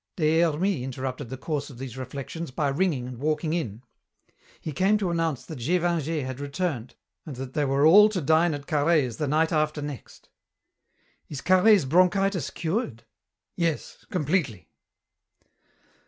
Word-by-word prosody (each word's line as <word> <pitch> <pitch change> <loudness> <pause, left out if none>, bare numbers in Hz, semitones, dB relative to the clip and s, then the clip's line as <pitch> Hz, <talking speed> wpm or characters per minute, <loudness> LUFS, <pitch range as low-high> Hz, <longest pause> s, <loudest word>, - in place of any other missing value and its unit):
Des 160 -3 +2
Hermies 170 -2 +1
interrupted 130 0 -5
the 130 - -6
course 145 +2 -3
of 130 - -12
these 130 -2 -7
reflections 140 +5 -6
by 140 +2 -1
ringing 140 -4 0
and 125 -2 -8
walking 155 +2 -1
in. 125 - -3 0.8
He 155 - -5
came 190 +8 +2
to 195 -4 -1
announce 165 -5 -1
that 155 -5 -8
Gévingey 165 0 0
had 130 0 -6
returned 140 -4 -3 0.3
and 150 - -8
that 130 +1 -7
they 150 - +1
were 135 +2 +2
all 205 +6 +8
to 205 -3 -2
dine 160 +1 +3
at 145 0 -8
Carhaix's 145 -6 +1
the 150 - -1
night 160 +3 +2
after 155 -1 0
next. 145 -3 -8 1.0
"Is 140 -2 -6
Carhaix's 185 0 +5
bronchitis 185 +3 +2
cured?" 165 - -3 0.5
"Yes, 165 -3 -2
completely." 145 - -1
155 Hz, 150 wpm, -26 LUFS, 135-170 Hz, 1.0 s, all